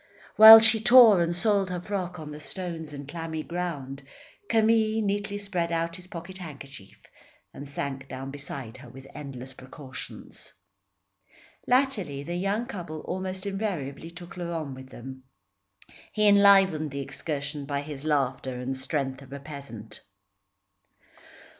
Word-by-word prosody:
While 220 +1 +12
she 225 0 +6
tore 235 -5 +8
and 170 0 0
soiled 200 +1 +2
her 180 -1 -3
frock 180 -1 -4
on 150 -1 -8
the 150 - -8
stones 165 -1 -6
and 140 -1 -8
clammy 160 0 -5
ground, 150 -6 -5 0.5
Camille 220 0 +3
neatly 205 0 -2
spread 180 -4 -3
out 165 0 -1
his 180 0 -12
pocket 185 +1 -9
handkerchief 140 - -11 0.5
and 140 0 -9
sank 135 -1 -5
down 135 +1 -7
beside 135 -4 -6
her 130 -2 -13
with 135 +2 -13
endless 130 -2 -8
precautions. 130 0 -10 1.1
Latterly 230 - +1
the 170 +4 -5
young 200 +6 -1
couple 170 -10 -7
almost 185 +1 -5
invariably 175 -8 -4
took 175 +2 -11
Laurent 165 -5 -4
with 130 0 -11
them. 130 +2 -10 0.9
He 210 -1 +2
enlivened 195 -6 +5
the 140 0 -5
excursion 145 0 -5
by 140 -1 -2
his 145 -1 -8
laughter 135 -4 -1
and 130 +1 -3
strength 135 0 -3
of 135 -1 -15
a 140 - -6
peasant. 140 -7 -10
160 Hz, 140 wpm, -27 LUFS, 140-190 Hz, 1.1 s, While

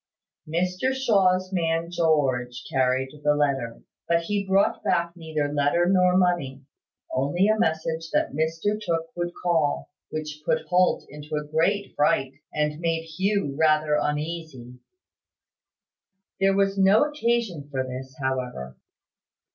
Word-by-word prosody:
Mr 185 +10 0
Shaw's 190 -7 +2
man 165 -1 0
George 130 -8 +1
carried 130 0 +1
the 150 0 +3
letter; 135 -6 -1 0.2
but 170 0 +2
he 200 +3 -2
brought 195 +1 +2
back 170 +1 0
neither 155 -3 -3
letter 145 +4 +2
nor 180 -1 +4
money: 170 -8 0 0.5
only 145 +9 +1
a 215 0 +2
message 160 -4 -1
that - - 0
Mr 165 +8 -1
Tooke 165 -3 -2
would 175 0 -2
call; 160 -6 0 0.2
which 155 -1 -5
put 160 - +1
Holt 180 0 +2
into 150 +1 -7
a 150 - -1
great 170 +7 0
fright, 135 -2 +2 0.2
and 150 0 -1
made 165 -1 -1
Hugh 165 -2 -1
rather 155 0 +3
uneasy. 150 -5 -4 1.6
There 195 0 +3
was 195 0 +1
no 195 +6 +5
occasion 235 - -1
for 130 -2 -2
this, 130 +1 -7
however. 125 - -3
160 Hz, 130 wpm, -25 LUFS, 145-185 Hz, 1.6 s, no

